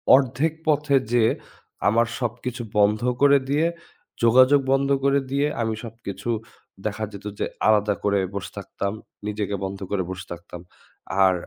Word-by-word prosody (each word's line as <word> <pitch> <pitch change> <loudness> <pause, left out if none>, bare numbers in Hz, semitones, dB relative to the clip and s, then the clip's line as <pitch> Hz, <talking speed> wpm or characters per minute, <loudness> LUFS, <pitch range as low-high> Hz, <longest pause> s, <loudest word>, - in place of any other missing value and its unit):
অর্ধেক 135 +4 +1
পথে 150 -2 +3 0.2
যেয়ে 115 -2 +4 0.6
আমার 115 +2 +4
সবকিছু 120 +1 -3 0.2
বন্ধ 105 +1 +4 0.2
করে 140 0 +7
দিয়ে, 150 +4 +3 0.6
যোগাযোগ 130 +4 +6
বন্ধ 135 0 +2 0.2
করে 140 0 +4
দিয়ে, 140 +1 +2
আমি 110 -1 0
সবকিছু 110 -2 -7 0.6
দেখা 105 +1 -4
যেত, 100 0 -10
যে - - +1 0.2
আলাদা 105 -1 +4
করে 100 -1 +2 0.2
বসে 100 -1 -4
থাকতাম। 100 +1 -4 0.3
নিজেকে 105 -1 -2
বন্ধ 95 0 -5
করে 100 -2 +1
বসে 95 0 -6
থাকতাম। 85 0 -8 0.6
আর 95 -1 +5
115 Hz, 140 wpm, -24 LUFS, 100-135 Hz, 0.6 s, করে